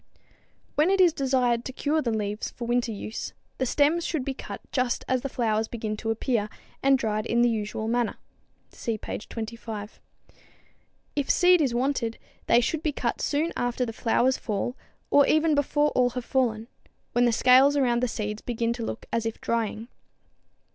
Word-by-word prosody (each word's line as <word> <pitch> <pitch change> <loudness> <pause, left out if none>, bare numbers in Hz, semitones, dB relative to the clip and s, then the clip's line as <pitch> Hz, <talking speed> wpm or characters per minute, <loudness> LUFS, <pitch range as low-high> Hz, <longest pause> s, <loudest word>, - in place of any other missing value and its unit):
When 305 +4 +3
it 390 0 +2
is 355 -3 +6
desired 255 -4 +1
to - - -4
cure 300 +4 0
the 240 - -1
leaves 210 -1 -2
for 240 - -7
winter 240 0 0
use, 215 +1 -5 0.3
the 260 - +1
stems 300 +6 +2
should 310 -7 -2
be 275 - -2
cut - - -7
just 255 -2 0
as 255 -1 +1
the 275 - -3
flowers 220 -3 0
begin 220 -2 -4
to 225 - -4
appear, 225 -1 0 0.3
and 270 0 +5
dried 215 -3 -1
in 235 +1 +3
the 240 - +4
usual 220 0 -3
manner. 235 -1 0 0.5
(See 230 -2 -3
page 210 - -7
25.) 220 -2 -6 1.2
If 285 -2 -1
seed 360 -1 +5
is 260 -5 +1
wanted, 245 -3 0 0.3
they 235 - +5
should 300 +5 -1
be 310 - 0
cut 245 -4 -2
soon 310 +3 0
after 245 +1 -1
the 225 - -5
flowers 245 +3 +2
fall 215 +3 -2 0.4
or 285 -1 +6
even 310 0 +3
before 295 +1 +2
all 250 -1 +3
have 245 0 -5
fallen 230 -4 0 0.4
when 245 0 +3
the 240 - +4
scales 260 +5 +5
around 240 -3 +2
the 250 - +2
seeds 210 -1 -4
begin 235 -1 -1
to 235 -1 -5
look 225 - -5
as 230 -1 0
if 225 - -5
drying. 230 -1 -2
240 Hz, 180 wpm, -26 LUFS, 225-275 Hz, 1.2 s, is